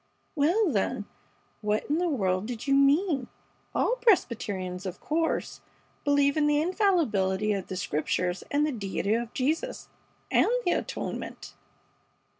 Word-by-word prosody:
"Well, 340 +6 +3
then, - - -1 0.6
what 210 0 0
in 300 +3 +1
the 355 -1 +1
world 190 - 0
did 240 -2 -5
you 275 - +2
mean? 280 0 +3 0.5
All - - +2
Presbyterians, 200 - +1
of 185 -1 -6
course, 325 +1 -1 0.4
believe 285 -1 +3
in 300 -1 +3
the 295 0 +3
infallibility 235 - +1
of 195 -2 -3
the 185 - -5
Scriptures 180 0 -1
and 295 +1 +2
the 305 - 0
deity 205 -3 -1
of 235 0 -1
Jesus 315 - -1 0.4
and - - +4 0.2
the 350 - +3
atonement!" - - -4
275 Hz, 135 wpm, -28 LUFS, 200-315 Hz, 0.6 s, and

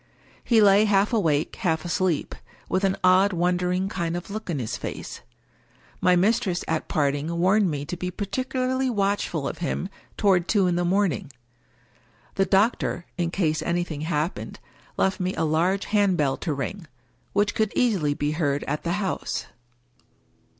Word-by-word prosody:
He 225 -3 +4
lay 200 +1 +6
half 205 +2 +2
awake, 160 -9 +1
half 165 -4 -1
asleep, 175 -2 0 0.3
with 185 - 0
an 195 0 +2
odd 185 +2 +5
wondering 180 +2 0
kind 170 -4 -2
of 175 +3 -8
look 215 -1 -6
in 165 - -1
his 120 -5 -3
face. - - -6 0.8
My 180 0 +4
mistress 195 -1 +1
at 160 -1 -1
parting 145 +3 0
warned 190 +3 +3
me 145 -2 -3
to 180 - -4
be 180 +1 -4
particularly 255 +6 -1
watchful 200 - 0
of - - -5
him 175 +2 -2 0.3
toward 185 -4 +3
two 205 -4 +3
in 180 -1 +1
the 175 - +1
morning. 180 -6 0 1.0
The 195 - +1
doctor 195 -3 +1
(in 170 -1 +1
case 160 -4 0
anything 170 -2 -2
happened) 155 +1 -3 0.4
left 190 +2 +1
me 185 0 -1
a - - -1
large 175 +6 +1
hand 205 -3 +2
bell 140 -3 +1
to 165 - -3
ring, 150 +6 -4 0.5
which 205 +1 +2
could 220 -2 0
easily 185 - +2
be 145 +1 -1
heard 145 -3 0
at 150 +2 -3
the 170 - -1
house. 195 -1 -2
180 Hz, 160 wpm, -25 LUFS, 160-200 Hz, 1.0 s, lay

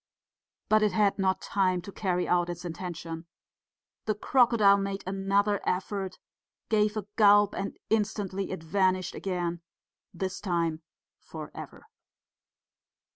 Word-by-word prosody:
But 215 0 +4
it 210 -3 +2
had 205 0 +2
not 190 -1 +1
time 185 -2 +1
to 200 - -8
carry 180 -2 -1
out 175 0 +2
its 175 +1 -6
intention; 165 -1 -6 0.8
the 215 - 0
crocodile 220 -4 +4
made 195 0 -3
another 195 +2 +1
effort, 190 +1 -2 0.5
gave 210 0 +2
a 210 - -3
gulp 205 -1 +6
and 195 - -4
instantly 205 -3 -1
it 185 -4 -5
vanished 185 +1 +1
again 175 -3 -3 0.5
this 190 0 -4
time 170 -4 -1 0.4
for - - -9
ever. - - -10
195 Hz, 125 wpm, -28 LUFS, 180-205 Hz, 0.8 s, gulp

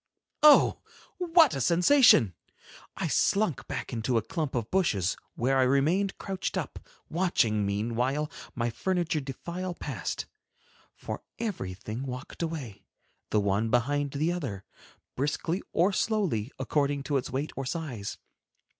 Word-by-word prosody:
Oh! 300 -1 +7 0.4
what 335 -4 +5
a 135 - -2
sensation! 175 - +6 0.6
I - - -1
slunk 200 -7 +1
back - - -5
into 115 +1 0
a 110 - +1
clump 145 +5 -3
of 115 -3 -2
bushes 105 - +1 0.2
where 135 +2 +2
I - - +5
remained 150 +10 +2
crouched 190 -1 -3
up, - - -4 0.3
watching, 115 - +1
meanwhile, 120 +8 -1 0.2
my 120 -1 -1
furniture 175 +2 0
defile 170 +7 -5
past—for - - -7 0.2
everything 110 - -4
walked 125 +5 -7
away, 135 - -4 0.5
the 105 - +2
one 100 +2 +1
behind 140 +4 +1
the 155 +4 +1
other, 130 - -4 0.5
briskly 150 +6 -1
or 185 +4 +3
slowly, 185 - 0
according 145 -1 0
to 140 0 0
its 130 - -3
weight 135 +4 -2
or 135 -1 -4
size. 130 - -4
140 Hz, 130 wpm, -28 LUFS, 115-175 Hz, 0.6 s, Oh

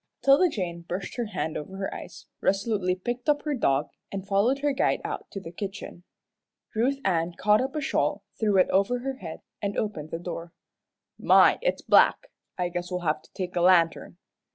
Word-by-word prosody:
'Tilda 280 +7 +6
Jane 175 - -4
brushed 180 +2 -5
her 240 - -1
hand 185 -6 -3
over 190 +6 -6
her 195 0 -3
eyes, - - -9 0.2
resolutely 195 -2 +1
picked 240 +9 -4
up 290 0 +2
her 300 - -1
dog, 145 - +1 0.2
and 195 -1 -5
followed 205 +7 +2
her 290 - +3
guide 270 - +1
out - - -5
to 195 - -6
the 165 -3 -9
kitchen. 195 -1 -7 0.7
Ruth 250 +5 +1
Ann 170 -2 +1
caught 210 +3 +4
up 265 +2 -3
a 305 - -1
shawl, 275 - 0 0.2
threw 210 -3 +2
it 185 - +5
over 200 +6 +2
her 270 +1 -4
head, 165 -7 -8 0.2
and 200 0 -2
opened 160 -8 -3
the 165 - -3
door. 170 -1 -7 0.7
"My - - +6
it's - - -1
black! - - +4 0.3
I 180 -1 0
guess 175 0 -4
we'll 180 -1 -3
have 155 -2 0
to - - -22
take 180 -1 -5
a 175 - +1
lantern." 175 -1 +3
195 Hz, 195 wpm, -27 LUFS, 175-240 Hz, 0.7 s, Tilda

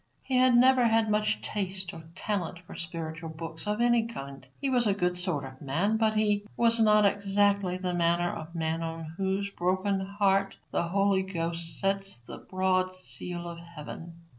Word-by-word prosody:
He 265 - -2
had 255 -1 +5
never 255 0 +6
had 225 -1 +3
much 215 0 +1
taste 190 -3 -2
or 165 - -8
talent 190 -3 -2
for - - -10
spiritual 165 -1 -5
books 160 +3 -7
of 210 +1 0
any 235 -1 +3
kind. 140 - -8
He 280 - -1
was 250 -3 +2
a 200 - +2
good 180 -2 0
sort 180 -6 -2
of 130 0 -11
man, 175 +11 +1
but 220 -1 +2
he 210 -1 +2
was 230 0 +3
not 210 -1 +5
exactly 200 -2 +2
the 185 -1 -2
manner 175 0 +2
of 165 +1 -8
man 165 0 -1
on 165 -1 -5
whose 195 +1 -1
broken 190 +2 0
heart 195 0 +1
the 170 - 0
Holy 195 +1 +2
Ghost 170 -3 -4
sets 195 0 0
the - - -8
broad 185 0 0
seal 175 -1 -5
of 170 0 -7
heaven. 170 0 -9
190 Hz, 180 wpm, -29 LUFS, 170-210 Hz, -, never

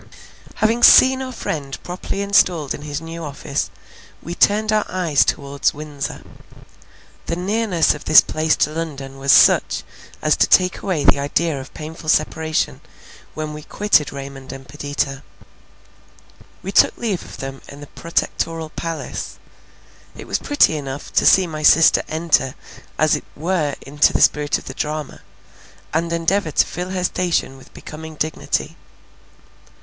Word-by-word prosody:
Having 225 +2 +1
seen 260 +2 +7
our 260 -1 -5
friend 145 - -5
properly 185 +2 -4
installed 180 -7 +2
in - - -8
his 145 0 -5
new 165 +1 -7
office, 145 -1 -4 0.5
we 170 - -6
turned 210 +4 +2
our 215 -1 +2
eyes 170 -6 +2
towards 140 0 -1
Windsor. 150 -2 -6 1.0
The 170 - -1
nearness 190 -1 +1
of 150 - -10
this 155 - +8
place 155 0 +1
to 150 - 0
London 140 -4 -6
was 135 0 +2
such, - - +5 0.4
as - - +2
to - - +3
take 180 0 +3
away 180 -7 -1
the - - +4
idea 145 +1 -1
of 130 - -12
painful 155 0 -7
separation, 155 +1 0 0.5
when 155 -1 -4
we 150 - -8
quitted 175 -3 +1
Raymond 135 -1 -8
and 135 0 -10
Perdita. 140 0 -3 1.4
We 195 - -4
took - - +4
leave 215 -7 -2
of - - -11
them 135 0 -7
in 140 - -11
the 145 - -9
Protectoral 165 0 -3
Palace. 165 -1 -5 0.8
It - - -9
was - - -2
pretty 290 - +3
enough 140 0 -7
to - - +3
see 190 - +6
my 155 -3 -6
sister 160 +2 +6
enter 155 -4 +1 0.4
as 155 -1 +3
it - - -6
were 155 -3 -1
into 145 +2 +2
the - - +1
spirit 150 0 +3
of - - -13
the - - -7
drama, 150 -2 -5 0.7
and 165 +2 -1
endeavour 170 +2 0
to - - +2
fill 180 +2 -6
her 185 -1 -3
station 175 -7 -1
with 135 - -17
becoming 160 0 -9
dignity. 155 +1 -3
155 Hz, 155 wpm, -20 LUFS, 145-180 Hz, 1.4 s, this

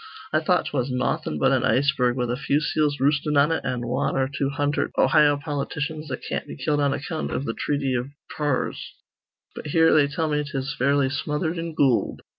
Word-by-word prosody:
I 155 - +4
thought 180 +3 +1
'twas 135 -2 -2
nawthin' 125 -11 -1
but 75 - +3
an - - +2
iceberg 130 -3 +2
with 125 -1 -1
a - - 0
few 140 +2 0
seals 150 -1 0
roostin' 145 +2 +1
on 145 +3 +4
it, 160 - -1
an' 125 -1 -3
wan 130 +3 -1
or 130 0 +2
two 140 0 -2
hundherd 145 +1 -1
Ohio 145 +2 +4
politicians 150 +1 -4
that 130 -3 -5
can't - - -3
be - - -8
killed 145 +2 0
on 140 -1 +2
account 155 +4 -3
iv - - -2
th' 115 - -2
threaty 140 -2 0
iv 120 +1 -2 0.3
Pawrs. 145 -4 -1 0.7
But - - -8
here 165 +2 +4
they 145 -2 +5
tell 160 +3 -2
me 150 -1 0
'tis 135 -2 -4
fairly 140 -1 +1
smothered 150 +3 -2
in 165 -1 -5
goold. 135 -6 +1
145 Hz, 205 wpm, -24 LUFS, 135-150 Hz, 0.7 s, they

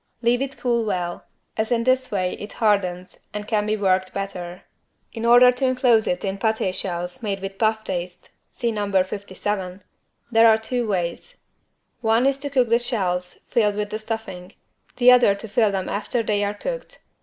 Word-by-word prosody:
Leave 240 +2 +2
it 275 0 -4
cool 235 -2 0
well, 180 -5 -3 0.3
as 220 +2 -1
in 230 -1 +2
this 255 +1 +2
way 185 -3 -1
it 205 - -8
hardens 185 -4 -1
and 210 0 -5
can 210 -2 0
be 215 0 0
worked 185 -2 +1
better. 185 -3 -5 0.5
In 230 -1 -4
order 245 +1 +7
to 250 +2 -2
enclose 250 -4 +3
it 180 +3 -1
in 195 0 -3
paté 220 -3 0
shells 180 +2 -3
made 200 -3 -2
with 195 0 -7
puff 220 -1 +1
paste 180 -1 -5 0.2
(see 235 -2 -2
No. 205 -2 -3
57) 190 -1 -5 0.5
there 225 0 +6
are 220 - +5
two 235 +1 -2
ways. 190 - -3 0.6
One 225 +2 +3
is 275 0 +2
to 285 +1 -4
cook 255 -4 +2
the 230 +1 +4
shells 180 -7 -2
filled 210 -4 +2
with 210 0 -3
the 215 - -3
stuffing, 215 -4 -6 0.4
the 250 0 +7
other 245 -5 +5
to 200 +3 -7
fill 220 -1 +2
them 190 -1 -2
after 220 +3 -2
they 205 -2 0
are 205 0 -2
cooked. - - -6
210 Hz, 185 wpm, -23 LUFS, 190-235 Hz, 0.6 s, order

